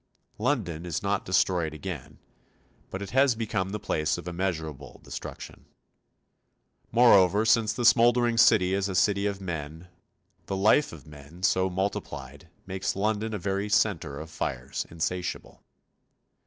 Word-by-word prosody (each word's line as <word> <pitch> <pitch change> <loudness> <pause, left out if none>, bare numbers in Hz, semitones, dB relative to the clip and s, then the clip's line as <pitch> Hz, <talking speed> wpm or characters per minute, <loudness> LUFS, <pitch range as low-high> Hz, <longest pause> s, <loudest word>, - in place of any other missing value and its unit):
London 105 - -1
is 85 +2 -4
not 100 0 -1
destroyed 90 -4 +1
again, 80 -4 -7 0.7
but 95 +1 -5
it 100 - -8
has 135 0 +4
become 105 -4 -2
the 105 +2 -4
place 75 -4 -1
of 85 - -8
immeasurable 80 -6 -4
destruction. - - -9 1.3
Moreover, 105 -4 +5
since 115 -1 +3
the 120 +2 -2
smouldering 120 0 +4
city 95 -5 +5
is 100 0 0
a 95 - -3
city 100 +2 +2
of 100 -1 -3
men, 80 -2 -6 0.6
the 95 - -2
life 110 +9 +3
of 80 -2 -12
men, 75 +4 -13
so 95 -2 +2
multiplied, 95 +2 -4 0.2
makes 95 0 -3
London 105 +2 -1
a - - -1
very 100 +2 -2
centre 85 -9 +1
of 80 +1 -9
fires 65 -3 -4
insatiable. 90 +2 -4
95 Hz, 140 wpm, -27 LUFS, 85-105 Hz, 1.3 s, Moreover